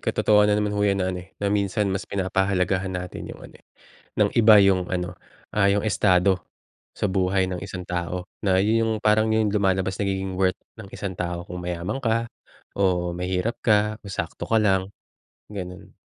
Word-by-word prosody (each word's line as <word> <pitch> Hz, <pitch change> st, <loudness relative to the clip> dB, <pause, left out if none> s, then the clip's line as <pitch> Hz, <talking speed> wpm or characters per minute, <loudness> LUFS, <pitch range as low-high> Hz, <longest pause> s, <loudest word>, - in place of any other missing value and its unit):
katotohanan 105 Hz, 0 st, +3 dB
na -, -, +1 dB
naman 105 Hz, -, -2 dB
ho 105 Hz, -, -1 dB
’yan 100 Hz, -1 st, +2 dB
na, 95 Hz, -, -1 dB
ano, 90 Hz, -, -5 dB
eh, 95 Hz, +2 st, -17 dB
na 100 Hz, 0 st, -1 dB
minsan 105 Hz, +1 st, 0 dB
mas 95 Hz, -, -4 dB
pinapahalagahan 95 Hz, 0 st, 0 dB
natin 90 Hz, 0 st, -6 dB
’yong, -, -, -9 dB
ano, -, -, -13 dB
eh, -, -, -40 dB, 0.5 s
ng -, -, +3 dB
iba 110 Hz, -2 st, +7 dB
’yong, 95 Hz, -2 st, +4 dB
ano, 90 Hz, -1 st, -2 dB, 0.4 s
ah, 100 Hz, -2 st, +3 dB
’yong 100 Hz, +1 st, +1 dB
estado 95 Hz, -3 st, +3 dB, 0.6 s
sa -, -, -3 dB
buhay 95 Hz, 0 st, +2 dB
ng 90 Hz, -1 st, -4 dB
isang 90 Hz, -1 st, -6 dB
tao, 90 Hz, +1 st, -3 dB, 0.2 s
na 95 Hz, -3 st, +2 dB
’yon 110 Hz, +4 st, +3 dB
'yong 115 Hz, 0 st, +1 dB
parang 110 Hz, +1 st, +4 dB
’yon 110 Hz, -2 st, +1 dB
lumalabas, 95 Hz, -2 st, 0 dB
nagiging 95 Hz, -1 st, -1 dB
worth 95 Hz, 0 st, +1 dB, 0.2 s
ng 100 Hz, -, -10 dB
isang 100 Hz, -2 st, -4 dB
tao 85 Hz, -1 st, -4 dB
kung 90 Hz, 0 st, -7 dB
mayaman 90 Hz, +8 st, -3 dB
ka 115 Hz, -2 st, +1 dB, 0.5 s
o 90 Hz, -3 st, +1 dB
mahirap 90 Hz, +5 st, -2 dB
ka 105 Hz, 0 st, +2 dB
o 100 Hz, -, -11 dB
sakto 85 Hz, -4 st, -5 dB
ka 115 Hz, -, +3 dB
lang, 95 Hz, -3 st, +2 dB, 0.6 s
gano'n. 90 Hz, -3 st, -8 dB
95 Hz, 185 wpm, -24 LUFS, 90-105 Hz, 0.6 s, iba